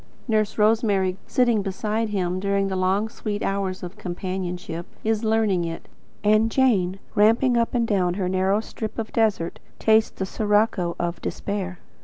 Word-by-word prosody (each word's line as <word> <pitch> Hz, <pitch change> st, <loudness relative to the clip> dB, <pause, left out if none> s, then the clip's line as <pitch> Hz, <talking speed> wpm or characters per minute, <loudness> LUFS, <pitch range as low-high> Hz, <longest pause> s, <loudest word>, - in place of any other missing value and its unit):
Nurse 215 Hz, -2 st, +1 dB
Rosemary, 210 Hz, -4 st, +2 dB
sitting 240 Hz, -4 st, +2 dB
beside 210 Hz, +3 st, -2 dB
him 185 Hz, -3 st, -1 dB
during 200 Hz, 0 st, +1 dB
long 190 Hz, +2 st, +1 dB
sweet 210 Hz, -2 st, -4 dB
hours 195 Hz, -2 st, -2 dB
of 180 Hz, +1 st, -8 dB
companionship, 180 Hz, -2 st, -4 dB, 0.2 s
is 220 Hz, 0 st, 0 dB
learning 220 Hz, -5 st, +2 dB
it; 165 Hz, 0 st, -5 dB, 0.4 s
and 215 Hz, +2 st, +4 dB
Jane, 205 Hz, -8 st, +2 dB, 0.2 s
ramping 230 Hz, +4 st, +4 dB
up 235 Hz, +1 st, +1 dB
and 235 Hz, -1 st, +2 dB
down 180 Hz, -4 st, +1 dB
her 190 Hz, -2 st, -1 dB
narrowing 190 Hz, +3 st, +1 dB
strip 220 Hz, -1 st, -6 dB
of 225 Hz, -1 st, -4 dB
desert, 210 Hz, -7 st, +1 dB, 0.2 s
tastes 220 Hz, 0 st, +4 dB
the 190 Hz, -, -4 dB
sirocco 205 Hz, -4 st, +1 dB
of 170 Hz, 0 st, -2 dB
despair. 190 Hz, -3 st, -3 dB
200 Hz, 150 wpm, -24 LUFS, 185-220 Hz, 0.4 s, and